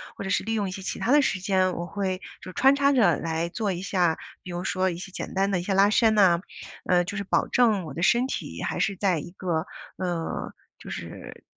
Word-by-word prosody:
或 - - -6
者 195 - -4
是 200 - +1
利 225 +2 -2
用 205 -3 0
一 - - -6
些 195 - -6
其 - - -4
它 240 - 0
的 290 +1 +6
时 195 -8 0
间， 185 -1 +1
我 170 0 -4
会 190 -1 -3 0.2
就 185 - -9
穿 270 +1 +5
插 280 0 +3
着 200 - +4
来 165 +1 -2
做 205 +1 -2
一 175 0 -4
下。 180 -4 +1 0.3
比 180 - -8
如 175 +1 -4
说 185 0 +1
一 170 - -4
些 185 +2 -8
简 - - -6
单 195 +1 +1
的 190 - +1
一 175 - -4
些 195 - -1
拉 195 +2 +5
伸 220 0 +4
呐， 185 -5 +5 0.5
呃， 175 -1 +3
就 200 +3 -5
是 205 - -2
保 195 - +1
证 220 -6 +3
我 150 - -7
的 170 +5 -3
身 245 +6 +4
体 - - -5
还 - - -2
是 200 - +1
在 185 -3 +1
一 170 +4 -8
个， 175 -3 -2 0.3
呃， 175 -3 -3 0.2
就 - - -11
是 - - -8
190 Hz, 270 characters per minute, -26 LUFS, 175-205 Hz, 0.5 s, 的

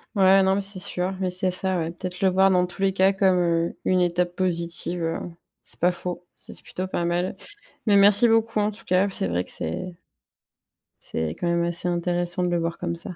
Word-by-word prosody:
Ouais, 195 0 +5
non, 190 0 +2
mais 200 - 0
c'est 195 -1 -5
sûr, 180 +1 -2
mais 185 -1 -1
c'est 185 +1 -1
ça, 185 0 -2
ouais. 165 -1 -2
Peut-être 180 +2 -7
le 190 - +4
voir, 190 +1 +4
dans 180 -1 +3
tous 180 +2 -9
les 195 -1 +2
cas, 190 +1 +3
comme, 190 -1 +2
heu, 170 -1 0
une 185 -1 +2
étape 175 0 0
positive, 170 -1 +1
heu. 165 0 -2 0.4
C'est - - -2
pas 175 +2 +3
faux, 180 0 -6
c'est - - -12
c'est - - -8
plutôt 185 +1 -5
pas 175 -2 -2
mal. 175 +2 -1 0.5
Mais 205 - +4
merci 205 +3 +6
beaucoup, 225 -1 +2
en 210 0 +1
tout 210 - -12
cas, 185 +2 +2
c'est 95 - -2
vrai 90 +1 -1
que - - -5
c'est 85 - -4 1.1
c'est 80 -1 -3
quand 170 - -4
même 170 0 +1
assez 170 +1 -1
intéressant 175 +1 -1
de 180 - 0
le 175 - +1
voir 165 0 -3
comme 170 -1 -3
ça. 175 - -8
180 Hz, 230 wpm, -24 LUFS, 175-190 Hz, 1.1 s, merci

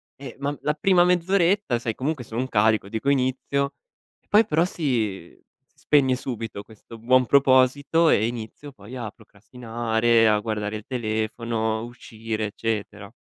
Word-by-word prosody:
Eh, 140 - -10
ma 145 +1 -2
la 150 - 0
prima 180 +2 +3
mezz'oretta, 180 - +2
sai 115 -2 -3
comunque 140 0 -3
sono 115 0 -6
un 130 - -1
carico 110 -3 +2
dico: 110 +6 -2
"Inizio"; 140 +1 0 0.6
poi 215 +2 +5
però 165 -4 +2
si 110 - -3 0.4
spegne 135 -3 +2
subito 115 -5 -6
questo 110 +1 -14
buon 125 +3 +3
proposito 140 +5 +3
e 110 - +3
inizio 120 +5 -7
poi 105 +1 -12
a 115 -4 -5
procrastinare, 115 +1 0
a 105 -1 +3
guardare 105 -1 -3
il 105 - -12
telefono, 110 -1 -2
uscire, 115 -2 -6
eccetera. 105 -1 -5
120 Hz, 140 wpm, -24 LUFS, 110-140 Hz, 0.6 s, poi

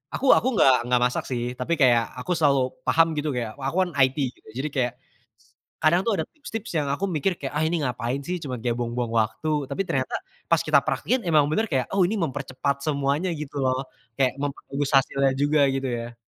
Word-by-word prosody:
Aku 275 - -3
aku 255 - +4
enggak 135 -8 +6
enggak 125 0 +2
masak 125 - -1
sih 120 -2 -2 0.2
tapi 165 +7 -1
kayak 120 -3 +5
aku 125 +8 -5
selalu 140 -4 +2 0.2
paham 165 0 +5
gitu 150 +1 -1
kayak, 115 -3 -2
wa 135 - -5
aku 165 - -2
kan 175 - -5
IT 130 +2 +4
gitu, - - -27 0.2
jadi 155 - -2
kayak 125 -2 +1 0.9
kadang 170 +3 +4
tuh 225 - +2
ada 160 - 0
tips-tips 225 -7 -7
yang 145 - 0
aku 195 - -3
mikir 175 +4 0
kayak, 135 -5 -6
"Ah 160 - +2
ini 165 -2 0
ngapain 125 +1 -2
sih, 180 +4 -3
cuma 140 -5 -5
kayak 120 -1 -1
buang-buang 120 0 -2
waktu," 130 +6 0
tapi 195 - -2
ternyata 195 - -2 0.3
pas - - +3
kita - - +4
praktekin 250 -7 -1
emang 150 -3 +3
bener 220 +8 +1
kayak, 130 - -1
"Oh 195 -2 +3
ini 210 - -2
mempercepat 140 -6 -2
semuanya," 145 +4 0
gitu 150 -2 -6
loh, 130 -1 +1 0.3
kayak 130 +1 +1
memperbagus 140 0 -3
hasilnya 135 0 +3
juga 145 +1 +3
gitu 135 -1 -1
ya. 120 0 -4
140 Hz, 205 wpm, -25 LUFS, 130-160 Hz, 0.9 s, enggak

